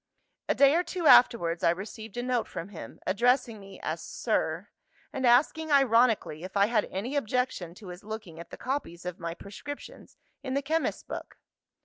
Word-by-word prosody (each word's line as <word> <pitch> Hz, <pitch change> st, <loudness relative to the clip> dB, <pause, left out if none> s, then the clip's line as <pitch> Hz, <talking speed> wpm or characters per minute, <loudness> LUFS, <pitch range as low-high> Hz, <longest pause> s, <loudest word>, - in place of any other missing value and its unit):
"A -, -, +3 dB
day 280 Hz, 0 st, +6 dB
or 340 Hz, -, +3 dB
two 345 Hz, 0 st, -4 dB
afterwards, 175 Hz, -, +5 dB
I -, -, +5 dB
received 205 Hz, +5 st, -5 dB
a 245 Hz, -, -1 dB
note 250 Hz, -2 st, 0 dB
from 165 Hz, +4 st, -6 dB
him; 160 Hz, -, -10 dB
addressing 235 Hz, +3 st, +2 dB
me 195 Hz, -1 st, -12 dB
as -, -, -3 dB
'Sir,' -, -, -2 dB, 0.4 s
and 260 Hz, -2 st, 0 dB
asking 305 Hz, +6 st, +3 dB
ironically 235 Hz, -, +3 dB
if 190 Hz, +2 st, -5 dB
I 200 Hz, -, +6 dB
had 215 Hz, -1 st, +1 dB
any 225 Hz, +9 st, -4 dB
objection 230 Hz, -9 st, -1 dB
to 200 Hz, -2 st, -11 dB
his 180 Hz, +1 st, -9 dB
looking 210 Hz, -6 st, -7 dB
at 170 Hz, -, -9 dB
the -, -, -9 dB
copies 245 Hz, -11 st, -4 dB
of 180 Hz, -1 st, -5 dB
my 170 Hz, 0 st, -4 dB
prescriptions 285 Hz, +11 st, -10 dB, 0.2 s
in 260 Hz, -1 st, -3 dB
the 280 Hz, -, 0 dB
chemist's 320 Hz, +4 st, -1 dB
book. -, -, -8 dB
225 Hz, 180 wpm, -28 LUFS, 185-265 Hz, 0.4 s, day